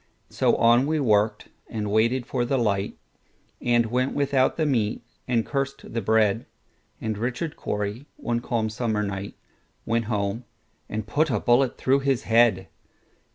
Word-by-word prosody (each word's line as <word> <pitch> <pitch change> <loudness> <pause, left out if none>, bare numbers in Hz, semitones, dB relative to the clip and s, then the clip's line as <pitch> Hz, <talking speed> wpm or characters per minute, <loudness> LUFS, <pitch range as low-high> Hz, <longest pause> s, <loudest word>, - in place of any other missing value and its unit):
So - - +2
on 120 +3 +4
we 155 0 +1
worked, 105 -4 +1 0.2
and 105 -3 -3
waited 115 +4 +2
for 125 0 -1
the 135 +3 0
light, 100 -5 0 0.6
And 120 -1 +3
went 125 +4 -1
without 135 -2 +2
the 160 - +1
meat, 115 -6 0 0.2
and 120 -3 +1
cursed 135 -1 -3
the 115 - -1
bread; 110 +1 +2 0.5
And 110 -2 -3
Richard 130 +7 -3
Cory, 105 +6 -4
one 120 0 -1
calm 115 -2 -1
summer 110 -1 -1
night, 100 0 -5 0.5
Went 115 0 0
home 105 +1 -2 0.4
and 110 0 -3
put 150 +8 +1
a 125 - +1
bullet 120 +1 +2
through 135 +1 +2
his 135 -1 0
head. 115 0 +3
115 Hz, 155 wpm, -25 LUFS, 110-130 Hz, 0.6 s, on